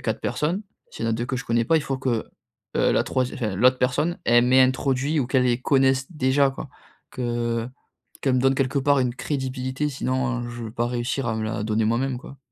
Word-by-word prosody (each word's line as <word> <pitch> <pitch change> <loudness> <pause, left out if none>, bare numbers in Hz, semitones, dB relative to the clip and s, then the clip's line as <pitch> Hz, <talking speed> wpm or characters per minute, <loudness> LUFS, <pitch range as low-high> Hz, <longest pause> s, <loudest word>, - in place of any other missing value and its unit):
4 - - -2
personnes, 175 +8 -1 0.3
s'il - - -6
y - - 0
en - - +1
a - - +1
2 120 +2 -3
que 130 - -2
je 125 - -5
connais 115 0 +1
pas, 165 - +4
il 155 - +1
faut 135 -2 -3
que, 125 -4 -1 0.5
heu, - - +3
la - - +3
troisiè 130 -1 -1
enfin, 110 -6 -2
l'autre 125 +4 +4
personne, 150 +7 0
elle 120 0 +5
m'introduit 130 +3 +3
ou 125 - -1
qu'elle 130 0 +2
les 120 0 +1
connaisse 130 -1 +2
déjà, 135 -1 +2
quoi. 135 - -8 0.4
Que 120 -2 -2 0.5
qu'elle 135 -2 +2
me 125 - +2
donne, 135 +1 +3
quelque 135 +1 +1
part, 140 +1 +3
une 125 -2 0
crédibilité, 130 0 -3
sinon, 130 -2 -1
heu, 120 - -5
je 120 -1 -7
vais 110 - -6
pas 120 0 -1
réussir 120 +2 -2
à 110 - -1
me 110 - -2
la 110 0 -3
donner 110 0 +1
moi-même, 125 +3 0
quoi. 135 +2 -12
130 Hz, 230 wpm, -24 LUFS, 120-135 Hz, 0.5 s, elle